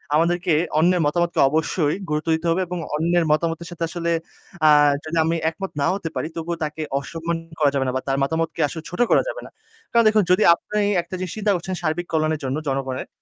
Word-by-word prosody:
আমাদেরকে 175 +2 +2 0.3
অন্যের 175 +2 +3
মতামতকে 170 +3 0
অবশ্যই 155 0 0
গুরুত্ব 150 +2 -2
দিতে 160 +1 -3
হবে 170 +3 +2
এবং 180 +1 -4 0.2
অন্যের 170 +2 +2
মতামতের 165 +2 0
সাথে 170 -1 -5
আসলে 170 -1 -2 0.6
আ - - +8 0.3
যদি 160 +1 -4
আমি 165 +1 +1
একমত 190 +4 -6
নাও 140 - +2
হতে 170 -5 -5
পারি - - -2
তবুও 170 +1 -3
তাকে 155 +1 -4 0.2
অসম্মান 165 +3 -4 0.2
করা 150 -2 +4
যাবে 135 -1 0
না - - 0
বা 130 - 0
তার 135 0 +1
মতামতকে 160 +3 -1
আসলে 160 +1 -7
ছোট 180 - -8
করা - - +6
যাবে - - -4
না। - - -10 0.4
কারণ 235 -1 +4
দেখুন, 215 -1 +4
যদি 185 +4 +4
আপনি 210 +4 -5 0.2
একটা 175 +2 -8
জিনিস 185 -2 -4
চিন্তা 210 -1 +1
করছেন 180 +2 -4
সার্বিক 170 +1 -2
কল্যাণের 155 -1 +1
জন্য 135 +2 -2
জনগণের, 135 -1 -2
165 Hz, 205 wpm, -22 LUFS, 155-175 Hz, 0.6 s, আ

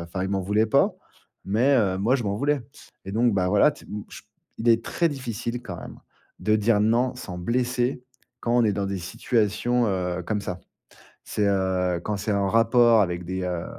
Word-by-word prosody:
enfin, 90 +2 -4
il 95 - -3
m'en 100 - 0
voulait 105 +4 +1
pas, 110 - +2 0.5
mais, 120 +8 +2
heu, 95 -5 +1
moi 115 +7 +2
je 125 - -3
m'en 100 - -1
voulais. 140 +4 0 0.4
Et 95 - -7
donc, 115 0 +2
bah, 90 -2 +1
voilà, 105 +9 +5
tu - - -16 0.2
ch - - -11
o - - -36 0.3
il 120 +1 +2
est 115 0 +3
très 170 +7 0
difficile, 120 -3 -4
quand 90 -7 -7
même, - - -10 0.4
de 110 0 +2
dire 105 0 +2
non 120 +4 +2
sans 95 -8 -7
blesser, 125 +6 -1 0.4
quand 120 +1 0
on 120 - +4
est 105 - +2
dans 100 0 -2
des 100 - -3
situations, 115 +6 0
heu, 90 -2 -2
comme 105 +4 -2
ça. 90 -2 -5 0.7
C'est, 105 - 0
heu, 95 -2 0
quand 105 - -2
c'est 100 +2 -3
en 100 -1 +1
rapport 115 +1 +5
avec 90 -2 -2
des, 95 +1 -3
heu, 90 -2 -3
105 Hz, 205 wpm, -25 LUFS, 95-120 Hz, 0.7 s, voilà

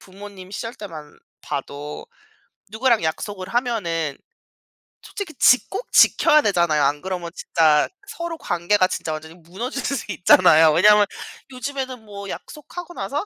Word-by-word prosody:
부모님 195 -1 -12
시절 230 +3 -6
때만 155 -8 -10 0.2
봐도 145 +2 -6 0.8
누구랑 235 -7 +3
약속을 185 +4 -4
하면은 185 - -1 0.8
솔직히 385 -6 -7
지 250 - +5
꼭 405 +6 -6
지켜야 305 0 +5
되잖아요. 170 - +2
안 145 +1 +1
그러면 180 -2 -5
진짜 155 -4 +2 0.2
서로 340 -3 -5
관계가 185 - +1
진짜 160 - -4
완전히 160 +1 -8
무너질 190 +11 -6
수도 275 - -3
있잖아요. 160 -3 +6
왜냐하면 210 +5 +6 0.5
요즘에는 260 -1 -5
뭐 200 -1 -9
약속하고 350 - -9
나서 295 +1 -4
195 Hz, 315 characters per minute, -22 LUFS, 165-250 Hz, 0.8 s, 있잖아요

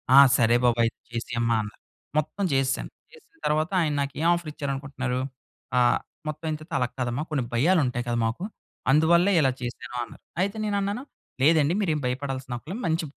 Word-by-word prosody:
"ఆ! - - +9 0.2
సరే 115 0 +4
బాబు 120 -1 +3
అయితే 115 - -2 0.2
చేసేయమ్మా" 115 0 0
అన్నారు, 105 0 -9 0.4
మొత్తం 155 +6 -1
చేసేసాను. 135 0 +1 0.2
చేసిన 415 -9 -19
తర్వాత, 155 +4 +1
ఆయన 155 -2 +1
నాకు, 140 0 -2
ఏం 165 - +3
ఆఫర్ 170 -3 -5
ఇచ్చారనుకుంటున్నారు? 135 -3 -3 0.6
ఆహ్, 120 -1 +4 0.3
మొత్తం 155 +1 -4
అయిన 155 -1 -1
తర్వాత 160 +1 -11
"అలాగ 125 -1 0
కాదమ్మా 125 +4 -1
కొన్ని 140 -4 +1
భయాలు 165 +10 +4
ఉంటాయి 125 -1 -1
కదా! 120 - 0
మాకు 115 +10 -4 0.5
అందువల్లే 170 +6 +5
ఇలా 135 -2 +3
చేశాను" 120 0 -6
అన్నారు. - - -12 0.2
అయితే 200 +3 -2
నేను 205 -1 0
అన్నాను 200 +6 -2 0.4
లేదండి, 155 +1 +5
మీరేం 155 -6 +1
భయపడాల్సిన 130 0 -3
అక్కర్లేదు, 185 - -7
మంచి 165 +1 +1
145 Hz, 175 wpm, -26 LUFS, 125-165 Hz, 0.6 s, ఆ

